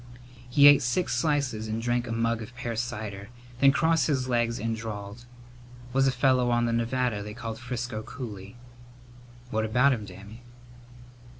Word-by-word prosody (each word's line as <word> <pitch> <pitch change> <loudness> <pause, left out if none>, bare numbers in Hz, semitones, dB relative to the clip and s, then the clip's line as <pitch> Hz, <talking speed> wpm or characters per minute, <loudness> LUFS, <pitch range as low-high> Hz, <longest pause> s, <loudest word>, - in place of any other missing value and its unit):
He 140 +3 +7
ate 145 -1 +8
six 125 +9 0
slices 140 -8 0
and 110 +1 -2
drank 120 +1 -1
a - - -5
mug 115 0 0
of 115 +3 -9
pear 120 -2 -4
cider, 105 -4 -5 0.3
then 140 0 +6
crossed 160 0 +2
his 130 -4 0
legs 120 -1 0
and 115 +1 -2
drawled, 110 +1 -7 0.7
"Was 135 0 +3
a - - +3
fellow 130 -1 +2
on 120 0 +2
the 115 - 0
Nevada 115 -2 0
they 105 +1 -7
called 115 -1 -6
Frisco 120 -2 -4
Cooley." 105 -4 -8 1.0
"What 110 0 0
about 125 +5 +3
him, 110 -4 -4
Dammy?" 100 +5 -12
120 Hz, 165 wpm, -27 LUFS, 110-130 Hz, 1.0 s, ate